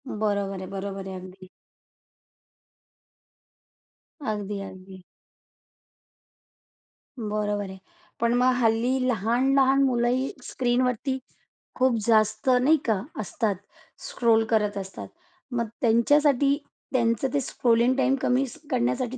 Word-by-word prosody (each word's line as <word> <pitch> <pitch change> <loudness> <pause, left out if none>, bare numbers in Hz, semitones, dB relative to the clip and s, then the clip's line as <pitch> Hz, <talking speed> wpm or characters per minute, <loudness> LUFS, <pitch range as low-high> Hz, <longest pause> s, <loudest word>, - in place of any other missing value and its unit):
बरोबर 200 -4 -1
आहे, 185 - -6
बरोबर 195 0 -5
आहे. 190 - -6
अगदी 185 0 -11 2.8
अगदी-अगदी. 195 -3 -5 2.2
बरोबर 210 -2 -2
आहे. 190 - -9 0.4
पण 235 0 +2
मग 255 0 +4
हल्ली 230 +3 +2
लहान-लहान 260 +5 +3
मुलंही 255 0 +1
स्क्रीनवरती, 250 +1 0 0.6
खूप 255 -1 +2
जास्त 220 +1 +2
नाही 260 +5 +5
का 220 -5 +1 0.2
असतात? 215 0 -1 0.5
स्क्रोल 225 -2 +3
करत 210 -2 +1
असतात. 195 -1 -7 0.4
मग 235 -2 -1
त्यांच्यासाठी 280 +4 +3 0.4
त्यांचं 230 0 +2
ते 285 - +2
स्क्रोलिंग 240 0 +2
टाईम 270 0 +3
कमी 255 +2 +2 0.3
करण्यासाठी 175 - 0
230 Hz, 95 wpm, -25 LUFS, 205-255 Hz, 2.8 s, नाही